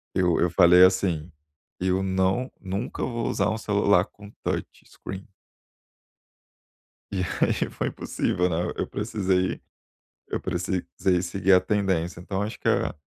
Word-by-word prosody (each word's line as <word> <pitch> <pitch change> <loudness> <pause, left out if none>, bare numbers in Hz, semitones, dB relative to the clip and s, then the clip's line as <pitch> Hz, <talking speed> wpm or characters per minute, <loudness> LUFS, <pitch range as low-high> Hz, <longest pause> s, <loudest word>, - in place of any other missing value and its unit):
Eu 90 -3 +2
eu 85 - +2
falei 90 +1 +7
assim: 90 -3 +1 0.5
"Eu 95 +1 +1
não 95 +6 0
nunca 100 +5 -4
vou 120 -2 -2
usar 100 +1 +1
um 110 - -1
celular 100 -3 +3
com 100 0 -14
touch - - -1 0.2
screen". 95 +2 -9 1.8
E 95 -1 0 0.2
aí - - 0
foi - - -2
impossível, 90 +1 -1
né. 85 +1 -1
Eu - - -1
precisei 95 -4 -1 0.7
eu - - -2
precisei 90 0 -1
seguir 95 +2 +1
a 90 - +7
tendência. 95 -4 -1
Então, 95 +2 -3
acho 110 - -4
que - - -2
é - - +2
95 Hz, 140 wpm, -25 LUFS, 90-100 Hz, 1.8 s, falei